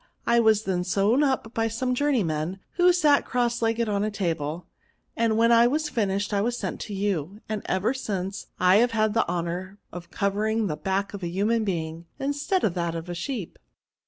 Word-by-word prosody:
I 235 Hz, 0 st, +4 dB
was 220 Hz, -2 st, +4 dB
then 180 Hz, -3 st, -1 dB
sewed 200 Hz, +8 st, +2 dB
up 265 Hz, -5 st, 0 dB
by 225 Hz, 0 st, +1 dB
some 250 Hz, +3 st, -1 dB
journeymen, 190 Hz, -, 0 dB
who 360 Hz, 0 st, +4 dB
sat 305 Hz, -5 st, +4 dB
cross 240 Hz, -1 st, -1 dB
legged 230 Hz, 0 st, +1 dB
on 205 Hz, -1 st, 0 dB
a 215 Hz, -, 0 dB
table; 170 Hz, -5 st, -3 dB, 0.5 s
and 225 Hz, -1 st, +1 dB
when 230 Hz, +1 st, +4 dB
I 235 Hz, 0 st, +6 dB
was 300 Hz, +4 st, 0 dB
finished, 205 Hz, -4 st, -1 dB
I 200 Hz, -, +2 dB
was 240 Hz, +3 st, -1 dB
sent -, -, -4 dB
to 210 Hz, -, -6 dB
you; 195 Hz, -1 st, -2 dB
and, 215 Hz, -1 st, -3 dB
ever 190 Hz, +7 st, +1 dB
since, 195 Hz, -6 st, -4 dB
I 185 Hz, +2 st, +5 dB
have 240 Hz, +1 st, +3 dB
had 215 Hz, -1 st, +2 dB
the 225 Hz, -, +2 dB
honour 180 Hz, +3 st, -3 dB
of 175 Hz, -1 st, -9 dB
covering 215 Hz, +3 st, 0 dB
the 155 Hz, -, -2 dB
back 195 Hz, +6 st, -2 dB
of 200 Hz, -, -6 dB
a 175 Hz, -, -2 dB
human 210 Hz, +6 st, +1 dB
being, 165 Hz, -3 st, -3 dB
instead 285 Hz, +7 st, -1 dB
of 190 Hz, -, +2 dB
that 170 Hz, -2 st, -2 dB
of 165 Hz, +1 st, -6 dB
a -, -, -3 dB
sheep." 195 Hz, -, -5 dB
205 Hz, 200 wpm, -25 LUFS, 180-235 Hz, 0.5 s, I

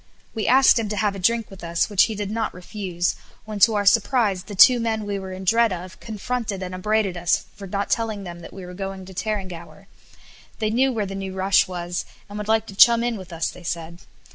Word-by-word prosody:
We 220 Hz, -, -2 dB
asked 260 Hz, -1 st, +6 dB
him 220 Hz, -2 st, -2 dB
to 210 Hz, -, -2 dB
have 205 Hz, 0 st, +1 dB
a 195 Hz, -, -7 dB
drink 230 Hz, +3 st, +1 dB
with 195 Hz, -, -12 dB
us 170 Hz, 0 st, 0 dB
which 205 Hz, -3 st, +4 dB
he 220 Hz, -, -4 dB
did 205 Hz, -1 st, -4 dB
not 220 Hz, -3 st, -2 dB
refuse; 180 Hz, -1 st, -2 dB, 0.3 s
when 215 Hz, -1 st, -6 dB
to 220 Hz, +2 st, +5 dB
our 205 Hz, -1 st, 0 dB
surprise 210 Hz, -2 st, +3 dB
the 205 Hz, +2 st, -9 dB
two 245 Hz, +5 st, +8 dB
men 220 Hz, -2 st, -1 dB
we 200 Hz, -1 st, -3 dB
were 190 Hz, -1 st, -7 dB
in 185 Hz, +1 st, -7 dB
dread 230 Hz, +3 st, +3 dB
of 180 Hz, +1 st, -7 dB
confronted 220 Hz, -2 st, -4 dB
and 185 Hz, 0 st, -6 dB
upbraided 205 Hz, 0 st, 0 dB
us 175 Hz, -1 st, +1 dB
for 195 Hz, -, -9 dB
not 200 Hz, +2 st, -3 dB
telling 220 Hz, -3 st, -1 dB
them 175 Hz, -2 st, -8 dB
that 170 Hz, -, -11 dB
we 190 Hz, -1 st, -9 dB
were 180 Hz, -, -9 dB
going 195 Hz, 0 st, -6 dB
to 190 Hz, -, -11 dB
Tarrangower. 185 Hz, -3 st, -5 dB, 0.7 s
They 215 Hz, -1 st, -1 dB
knew 260 Hz, +4 st, +3 dB
where 220 Hz, -4 st, -1 dB
the 195 Hz, -, -6 dB
new 195 Hz, -1 st, -5 dB
rush 190 Hz, +1 st, +3 dB
was, 175 Hz, -1 st, -4 dB, 0.2 s
and 205 Hz, +1 st, -7 dB
would 210 Hz, -, -5 dB
like 220 Hz, 0 st, +2 dB
to 200 Hz, -, -10 dB
chum 235 Hz, +3 st, +7 dB
in 240 Hz, -1 st, 0 dB
with 185 Hz, -3 st, -9 dB
us, 165 Hz, -1 st, -2 dB
they -, -, -13 dB
said. 170 Hz, 0 st, -5 dB
200 Hz, 240 wpm, -23 LUFS, 185-220 Hz, 0.7 s, two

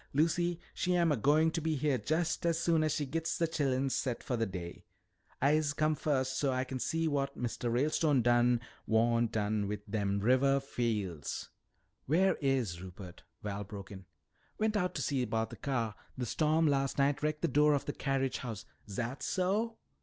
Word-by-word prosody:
"Lucy, 170 Hz, +3 st, +2 dB
she 180 Hz, 0 st, 0 dB
am 170 Hz, -2 st, +3 dB
a -, -, +3 dB
goin' 150 Hz, +7 st, +3 dB
be 160 Hz, -1 st, -1 dB
heah 140 Hz, -2 st, +1 dB
jest 165 Hz, +2 st, 0 dB
as 165 Hz, -1 st, +1 dB
soon 165 Hz, -2 st, +2 dB
as 155 Hz, -, +1 dB
she 145 Hz, -, -1 dB
gits 165 Hz, +4 st, -2 dB
de 170 Hz, -, +2 dB
chillens 135 Hz, -4 st, 0 dB
set 125 Hz, -3 st, -2 dB
for 125 Hz, -, -1 dB
de 115 Hz, -1 st, 0 dB
day. 90 Hz, -2 st, -7 dB, 0.6 s
I'se 145 Hz, +1 st, +2 dB
come 155 Hz, +1 st, +2 dB
fust 130 Hz, -3 st, 0 dB
so's 140 Hz, -, +1 dB
Ah 130 Hz, 0 st, +1 dB
kin 130 Hz, 0 st, -5 dB
see 165 Hz, +4 st, 0 dB
wat 140 Hz, -2 st, -1 dB
Mistuh 120 Hz, 0 st, -2 dB
Ralestone 140 Hz, +2 st, +2 dB
done 120 Hz, 0 st, +4 dB, 0.3 s
wan' 115 Hz, +1 st, +3 dB
done 105 Hz, -1 st, -1 dB
wi 105 Hz, +1 st, -2 dB
dem 100 Hz, -1 st, 0 dB
rivah 130 Hz, +5 st, +3 dB
fiel's 105 Hz, -, -3 dB, 0.3 s
" -, -, -44 dB
"Where 180 Hz, +7 st, +4 dB
is 125 Hz, -11 st, 0 dB
Rupert?" 90 Hz, -1 st, -10 dB, 0.2 s
Val 105 Hz, 0 st, -3 dB
broke 100 Hz, 0 st, -9 dB
in. 95 Hz, -2 st, -9 dB, 0.5 s
"Went 215 Hz, 0 st, +1 dB
out 180 Hz, -2 st, 0 dB
to -, -, -1 dB
see 135 Hz, -3 st, 0 dB
about 115 Hz, -1 st, -1 dB
the -, -, -7 dB
car. 120 Hz, -6 st, -2 dB, 0.2 s
The 125 Hz, -, -2 dB
storm 155 Hz, +7 st, +2 dB
last 135 Hz, -2 st, +1 dB
night 140 Hz, +1 st, +2 dB
wrecked 150 Hz, +1 st, -1 dB
the -, -, +4 dB
door 150 Hz, -1 st, +4 dB
of 140 Hz, -, -2 dB
the 145 Hz, -, -3 dB
carriage 135 Hz, -2 st, -1 dB
house 115 Hz, -4 st, -6 dB
" -, -, -25 dB
"Zat 120 Hz, +6 st, -3 dB
so?" 210 Hz, +5 st, 0 dB
135 Hz, 190 wpm, -32 LUFS, 115-155 Hz, 0.6 s, done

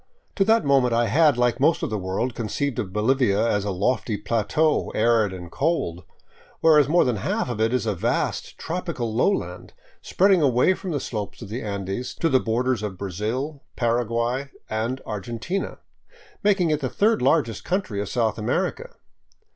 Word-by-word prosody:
To 195 Hz, -, +4 dB
that 220 Hz, -4 st, +3 dB
moment 130 Hz, -4 st, +3 dB
I 120 Hz, 0 st, +3 dB
had, 145 Hz, +4 st, +4 dB
like 125 Hz, +1 st, +1 dB
most 155 Hz, +5 st, +3 dB
of -, -, -2 dB
the 110 Hz, -, -1 dB
world, 95 Hz, +7 st, -2 dB
conceived 120 Hz, +4 st, -2 dB
of 100 Hz, -6 st, -3 dB
Bolivia 105 Hz, 0 st, +2 dB
as 105 Hz, -2 st, 0 dB
a -, -, -1 dB
lofty 105 Hz, +3 st, 0 dB
plateau, 115 Hz, +9 st, +1 dB
arid 110 Hz, -2 st, +3 dB
and 90 Hz, -2 st, -8 dB
cold; 135 Hz, -, -1 dB, 0.5 s
whereas 150 Hz, -3 st, +5 dB
more 175 Hz, +3 st, +4 dB
than 125 Hz, -4 st, 0 dB
half 95 Hz, -, -1 dB
of 110 Hz, -2 st, -3 dB
it 110 Hz, +1 st, +2 dB
is 125 Hz, -2 st, 0 dB
a 105 Hz, -, 0 dB
vast, 90 Hz, -, -2 dB
tropical 160 Hz, -9 st, -3 dB
lowland, 195 Hz, -, -1 dB, 0.3 s
spreading 190 Hz, -2 st, +3 dB
away 130 Hz, +5 st, +4 dB
from 190 Hz, 0 st, -7 dB
the 150 Hz, -4 st, -1 dB
slopes 110 Hz, -2 st, -5 dB
of 100 Hz, -, -9 dB
the 120 Hz, +5 st, -4 dB
Andes 100 Hz, +3 st, -4 dB
to 165 Hz, -, 0 dB
the 130 Hz, -3 st, +4 dB
borders 120 Hz, 0 st, 0 dB
of 105 Hz, -3 st, -5 dB
Brazil, 110 Hz, -, -3 dB
Paraguay, 120 Hz, +3 st, 0 dB, 0.2 s
and 115 Hz, +4 st, -2 dB
Argentina, 115 Hz, -, -4 dB, 0.6 s
making 195 Hz, -5 st, +2 dB
it 150 Hz, -, +1 dB
the 130 Hz, -4 st, -2 dB
third 215 Hz, -, +2 dB
largest 115 Hz, -10 st, +1 dB
country 180 Hz, -, -2 dB
of 100 Hz, -, -4 dB
South 115 Hz, -3 st, 0 dB
America. 190 Hz, -, -2 dB
120 Hz, 170 wpm, -24 LUFS, 105-150 Hz, 0.6 s, whereas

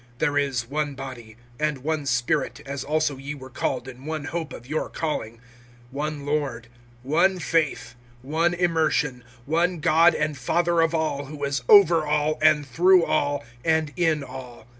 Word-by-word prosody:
(4)There 145 Hz, +1 st, +1 dB
is 130 Hz, -5 st, -2 dB
one 145 Hz, +1 st, -2 dB
body, 120 Hz, -5 st, -9 dB, 0.2 s
and 150 Hz, -4 st, -1 dB
one 155 Hz, -2 st, -2 dB
Spirit, 125 Hz, -1 st, 0 dB
as 140 Hz, -1 st, -4 dB
also 155 Hz, -2 st, 0 dB
ye 140 Hz, +2 st, -6 dB
were 130 Hz, -2 st, -11 dB
called 125 Hz, -, -2 dB
in 130 Hz, 0 st, -10 dB
one 155 Hz, -1 st, -3 dB
hope 160 Hz, 0 st, -4 dB
of 120 Hz, -, -10 dB
your 155 Hz, +3 st, -2 dB
calling; 115 Hz, -8 st, -4 dB, 0.5 s
(5)one 145 Hz, 0 st, -4 dB
Lord, 140 Hz, -5 st, -2 dB, 0.3 s
one 175 Hz, +8 st, +2 dB
faith, 165 Hz, -2 st, -1 dB, 0.3 s
one 165 Hz, +5 st, +1 dB
immersion, 160 Hz, -7 st, 0 dB, 0.2 s
(6)one 170 Hz, +3 st, +1 dB
God 165 Hz, +1 st, +4 dB
and 150 Hz, 0 st, -1 dB
Father 170 Hz, +6 st, +1 dB
of 165 Hz, 0 st, +1 dB
all, 155 Hz, -3 st, -1 dB
who 145 Hz, +1 st, -8 dB
is 140 Hz, -1 st, -1 dB
over 175 Hz, -6 st, +7 dB
all, 150 Hz, 0 st, 0 dB
and 155 Hz, -2 st, +4 dB
through 175 Hz, +6 st, +4 dB
all, 145 Hz, -3 st, 0 dB, 0.2 s
and 160 Hz, -2 st, +1 dB
in 160 Hz, -4 st, +1 dB
all. 125 Hz, -3 st, -10 dB
150 Hz, 160 wpm, -24 LUFS, 135-160 Hz, 0.5 s, over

